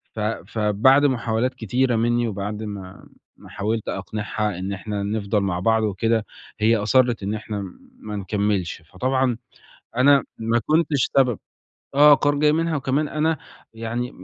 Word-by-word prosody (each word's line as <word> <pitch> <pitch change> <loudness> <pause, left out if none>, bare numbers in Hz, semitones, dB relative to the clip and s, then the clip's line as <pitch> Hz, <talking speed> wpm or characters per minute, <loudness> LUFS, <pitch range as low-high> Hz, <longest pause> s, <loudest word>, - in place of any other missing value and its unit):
ف 110 - -5
فبَعد 110 +5 +2
محاولات 125 -1 0
كتيرة 125 +2 0
منّي 120 +1 +1
وبَعد 105 +1 -4
ما 100 -3 -8 0.3
ما - - -15
حاولت 110 +2 -3
أقنِعها 105 -2 -3
إن 95 +2 -3
إحنا 100 +1 -4
نفضَل 105 0 -1
مع 95 -3 -1
بعض 110 +3 +2
وكده، 110 +2 0 0.3
هي 110 +2 +4
أصرِّت 120 +1 +2
إن 100 +2 -2
إحنا 105 -3 -5 0.3
ما 105 -1 -6
نكمّلش، 100 -3 -1
فطبعًا 125 - -1 0.6
أنا 135 +1 +5
ما 115 +1 +1
كنتش 155 -3 +2
سبب، 125 -5 +3 0.6
آه 145 +1 +8
قرار 145 0 +1
جاي 150 0 +4
منها 165 0 0
وكمان 140 +2 0
أنا 155 +1 0 0.4
يعني 115 +2 -3
110 Hz, 145 wpm, -23 LUFS, 105-130 Hz, 0.6 s, آه